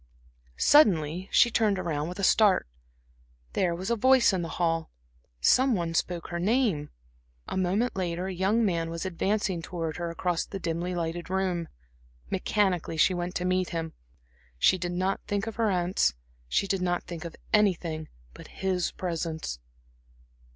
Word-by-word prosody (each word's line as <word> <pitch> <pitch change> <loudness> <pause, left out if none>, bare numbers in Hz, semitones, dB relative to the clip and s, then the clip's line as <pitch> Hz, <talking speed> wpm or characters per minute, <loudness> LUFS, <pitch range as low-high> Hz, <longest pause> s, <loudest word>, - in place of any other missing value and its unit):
Suddenly 180 - +4
she 240 - +5
turned 215 -3 +2
around 155 -4 -2
with 180 - -7
a 200 - -4
start. 200 - +4 0.9
There 175 -3 +1
was 190 +6 -4
a - - +3
voice 255 -1 +5
in 185 - 0
the 165 - -4
hall; 165 -2 0 0.5
some 260 - +4
one 170 -3 -2
spoke 170 +1 -2
her 170 - -3
name. 200 - +1 0.6
A - - -4
moment 190 +6 0
later 180 -1 -2
a 190 - -3
young 200 +6 +2
man 165 -4 0
was 165 +2 -4
advancing 190 0 -1
towards 165 -1 -4
her 170 -1 -2
across 170 0 -1
the 195 - -7
dimly 175 0 -3
lighted 170 0 -3
room. 185 -3 -1 0.6
Mechanically 185 -6 0
she 185 - +4
went 175 0 -3
to 180 - -1
meet 185 0 +1
him. 165 -1 -4 0.6
She 185 - +4
did 175 0 -3
not 185 +2 0
think 205 0 -1
of 225 -1 -6
her 225 -2 +2
aunts, 175 - +1 0.3
she - - +1
did 195 -1 -1
not 175 -1 0
think 170 -2 -7
of 170 -2 -7 0.2
anything 170 -7 +1 0.2
but - - -12
his 185 -2 -1
presence. 165 - -4
180 Hz, 165 wpm, -28 LUFS, 165-195 Hz, 0.9 s, she